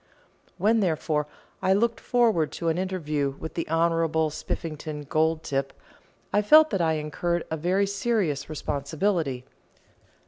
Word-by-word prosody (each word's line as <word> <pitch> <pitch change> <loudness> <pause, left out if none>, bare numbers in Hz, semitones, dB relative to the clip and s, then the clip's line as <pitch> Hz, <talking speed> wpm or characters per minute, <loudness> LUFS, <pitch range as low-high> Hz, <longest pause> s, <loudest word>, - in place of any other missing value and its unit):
When, 225 +2 +3
therefore, 155 -5 0 0.3
I 190 - +3
looked 230 +3 +1
forward 225 -11 +2
to 170 - -1
an 165 +2 0
interview 155 -7 -2
with 160 - -7
the 165 - -4
Honourable 165 -1 +1
Spiffington 155 -1 -5
Goldtip, 155 -3 0 0.6
I 205 - +4
felt 310 +9 +6
that 195 -4 0
I 160 -1 +2
incurred 160 +3 -2
a - - 0
very 185 +5 +1
serious 200 - -1
responsibility. 150 -2 -2
165 Hz, 130 wpm, -26 LUFS, 150-190 Hz, 0.6 s, felt